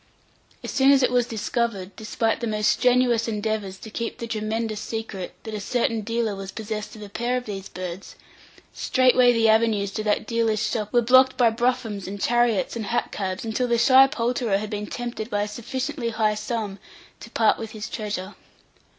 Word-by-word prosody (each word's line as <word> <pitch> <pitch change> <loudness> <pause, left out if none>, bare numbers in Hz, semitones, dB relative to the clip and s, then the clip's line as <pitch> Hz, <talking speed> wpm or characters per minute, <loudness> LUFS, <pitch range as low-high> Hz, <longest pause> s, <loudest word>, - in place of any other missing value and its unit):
As - - -4
soon 270 0 +4
as 275 -1 +6
it - - +3
was 245 -1 +2
discovered, 220 -3 -2
despite 225 +1 -1
the 235 - -2
most 210 -1 +2
strenuous 245 -2 +3
endeavours 210 -3 -2
to 220 - -11
keep 230 +1 -4
the 235 - -5
tremendous 220 -1 -2
secret, 220 -6 -5
that 220 - -7
a 210 - -3
certain 230 +1 0
dealer 225 -1 -1
was 195 0 -7
possessed 215 0 -5
of 215 - -9
a - - -8
pair 240 +4 -1
of 250 - -5
these 195 -2 -6
birds, 180 +1 -7 0.6
straightway 255 -1 +4
the 230 -1 +3
avenues 220 -2 +3
to 215 - -3
that 210 0 +1
dealer's 225 -1 +1
shop 210 -2 -2
were 240 -1 +3
blocked 260 +2 +5
by 235 -3 +5
broughams, 235 -4 -1
and 200 +1 -6
chariots, 240 -1 +1
and 220 -3 -4
hack 240 +2 -1
cabs, 190 +1 -3
until 225 +3 -1
the 240 -1 +2
shy 260 +3 +7
poulterer 240 -5 0
had 210 +1 -5
been 210 0 -3
tempted 240 -2 -5
by 205 -2 0
a - - -3
sufficiently 250 +3 -3
high 220 -1 +1
sum 210 -2 -4 0.4
to 230 - -11
part 225 -1 +2
with 225 - -5
his 215 -1 -5
treasure. 205 -3 -4
225 Hz, 195 wpm, -24 LUFS, 210-240 Hz, 0.6 s, shy